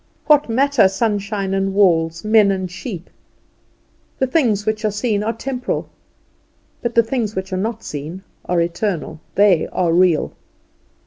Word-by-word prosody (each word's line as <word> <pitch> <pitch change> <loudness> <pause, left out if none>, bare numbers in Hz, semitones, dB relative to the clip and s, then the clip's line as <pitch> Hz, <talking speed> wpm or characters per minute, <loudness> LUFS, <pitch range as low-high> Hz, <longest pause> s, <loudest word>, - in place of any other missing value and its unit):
What 295 -4 +4
matter 265 -2 +4
sunshine 200 -1 -1
and 195 0 -1
walls, 165 -3 +2
men 215 -1 +5
and 185 -2 -2
sheep? 185 -2 -7 1.1
"The 265 - +1
things 240 -8 +1
which 215 0 -1
are 215 - +2
seen 210 0 -1
are 220 +2 0
temporal, 250 +2 -4 0.9
but 235 -2 -3
the 230 - +6
things 225 -2 -2
which 190 0 -4
are - - 0
not 220 +3 -3
seen 155 +6 -6 0.2
are 175 -1 0
eternal." 170 -1 -2 0.2
They 195 -4 +4
are 170 -2 0
real. 175 -2 +3
205 Hz, 145 wpm, -19 LUFS, 185-225 Hz, 1.1 s, the